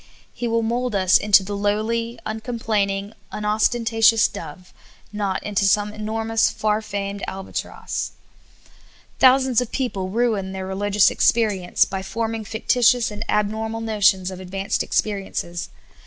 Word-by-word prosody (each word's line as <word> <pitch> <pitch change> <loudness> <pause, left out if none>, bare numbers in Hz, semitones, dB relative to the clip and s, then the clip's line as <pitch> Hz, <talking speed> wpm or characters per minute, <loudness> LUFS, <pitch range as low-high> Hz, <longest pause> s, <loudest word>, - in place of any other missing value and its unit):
He 240 - -3
will 230 0 +1
mold 240 0 -1
us 185 -2 +3
into 205 -1 +5
the 205 +2 -5
lowly, 220 +3 -1
uncomplaining, 215 -3 -2 0.2
unostentatious 225 +1 +3
dove, 180 -1 -10 0.4
not 200 -2 -2
into 205 -1 0
some 205 +1 +2
enormous, 220 +1 0
far 215 -1 0
famed 200 -1 -4
albatross. 190 0 -5 1.1
Thousands 260 -2 +5
of 245 - -5
people 200 -8 -2
ruin 210 -3 0
their 190 0 -5
religious 200 +2 +2
experience 205 -6 +1
56 - - -14
SOUL 195 - -2
FOOD. - - -3
b}' 190 0 -9
forming 225 -1 -2
fictitious 230 +2 +2
and 210 - -5
abnormal 220 +2 -1
notions 205 -4 +2
of 185 - -8
advanced 195 +1 -2
experiences. 195 -4 -2
210 Hz, 135 wpm, -22 LUFS, 195-225 Hz, 1.1 s, into